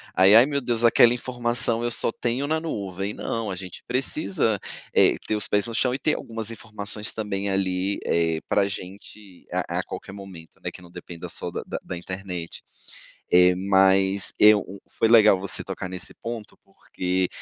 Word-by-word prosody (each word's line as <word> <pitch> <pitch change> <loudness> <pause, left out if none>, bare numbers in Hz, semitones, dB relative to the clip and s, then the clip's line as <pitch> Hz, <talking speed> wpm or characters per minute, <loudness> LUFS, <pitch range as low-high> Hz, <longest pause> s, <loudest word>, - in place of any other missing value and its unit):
aí, 95 +3 +7
"ai 115 +3 +9
meu 140 0 -1
Deus, 120 -2 -1
aquela 120 0 +6
informação 120 -1 -1
eu 120 - 0
só 115 - 0
tenho 120 +5 -2
na 160 +1 +1
nuvem", 100 - -4
não, 115 -1 -3
a - - -4
gente 90 -1 -9
precisa, 130 - 0 0.4
eh, - - +5
ter 110 - 0
os 105 - -1
pés 105 0 +1
no 115 - -6
chão 125 +2 +1
e 130 - -3
ter 150 +2 +1
algumas 115 -1 -5
informações 105 -1 -4
também 100 -2 -3
ali, 95 0 0
eh, 80 -1 +1
para 100 -1 +2
gente 100 0 -10
a - - -1
a - - -1
qualquer - - -8
momento, 95 -5 -12
né, - - -3
que - - -13
não 90 -1 -15
depende 85 -1 -9
só - - -4
da - - -4
da - - -3
da 90 - -3
internet. 90 -1 -6 0.7
Eh, 90 0 +6
mas, 95 0 +3
eu 105 0 +7
um 95 +2 -9
foi - - +1
legal 110 -4 +6
você 100 0 -3
tocar 95 - -6
nesse 90 -1 -6
ponto 115 -2 -7
porque, 90 0 -2
100 Hz, 185 wpm, -24 LUFS, 95-115 Hz, 0.7 s, ai